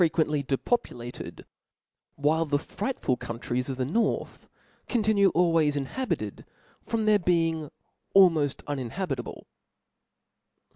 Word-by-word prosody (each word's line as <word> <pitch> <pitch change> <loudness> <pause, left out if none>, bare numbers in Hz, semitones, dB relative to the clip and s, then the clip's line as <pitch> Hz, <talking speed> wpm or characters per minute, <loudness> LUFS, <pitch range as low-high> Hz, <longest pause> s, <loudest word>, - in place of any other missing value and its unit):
uently 155 -3 +2
depopulated; 130 - -3 0.7
while 155 +3 +2
the 145 -3 +1
frightful 200 - -2
countries 120 +2 -3
of 130 - -3
the 130 - 0
north 220 - -1 0.4
continue 210 -4 +3
always 165 -4 +3
inhabited, 145 - -3 0.4
from 225 -2 -1
their 210 -1 +5
being 165 -4 +1 0.5
almoft 165 -8 +5
unin 135 -5 -3
habitable. 135 -5 -4
160 Hz, 100 wpm, -27 LUFS, 135-195 Hz, 0.7 s, their